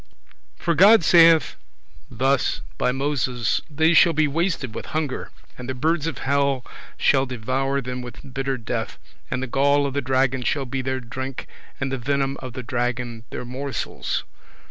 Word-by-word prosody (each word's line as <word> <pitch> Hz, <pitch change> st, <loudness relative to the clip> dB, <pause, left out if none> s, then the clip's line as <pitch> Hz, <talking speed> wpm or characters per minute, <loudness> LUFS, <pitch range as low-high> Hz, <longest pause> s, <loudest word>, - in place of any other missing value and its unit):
For 170 Hz, -, 0 dB
God 195 Hz, +5 st, +7 dB
saith 165 Hz, -1 st, +6 dB, 0.5 s
thus 130 Hz, +2 st, +1 dB, 0.2 s
by -, -, +2 dB
Moses, 130 Hz, -3 st, 0 dB
"They 160 Hz, +3 st, +3 dB
shall 165 Hz, +1 st, +6 dB
be 155 Hz, 0 st, +2 dB
wasted 150 Hz, -, -1 dB
with -, -, -6 dB
hunger, 150 Hz, -4 st, -3 dB, 0.3 s
and 125 Hz, 0 st, -7 dB
the 130 Hz, -, -2 dB
birds 160 Hz, +3 st, 0 dB
of 165 Hz, -, -3 dB
hell 140 Hz, -1 st, 0 dB, 0.3 s
shall 135 Hz, 0 st, +3 dB
devour 130 Hz, +3 st, -1 dB
them 125 Hz, 0 st, -5 dB
with 125 Hz, +1 st, -10 dB
bitter 135 Hz, 0 st, -1 dB
death, 115 Hz, -1 st, -4 dB, 0.3 s
and 130 Hz, -, -2 dB
the -, -, -1 dB
gall 140 Hz, +3 st, +2 dB
of 140 Hz, -, -2 dB
the 140 Hz, -, 0 dB
dragon 130 Hz, 0 st, +1 dB
shall 135 Hz, +2 st, 0 dB
be 130 Hz, +1 st, -3 dB
their 130 Hz, 0 st, -2 dB
drink, 130 Hz, +2 st, -6 dB, 0.3 s
and 135 Hz, 0 st, -2 dB
the 135 Hz, -, -2 dB
venom 135 Hz, +2 st, 0 dB
of 130 Hz, -2 st, -8 dB
the 130 Hz, 0 st, -6 dB
dragon 120 Hz, -1 st, -3 dB
their -, -, -6 dB
morsels." 130 Hz, +3 st, -3 dB
135 Hz, 165 wpm, -23 LUFS, 125-140 Hz, 0.5 s, God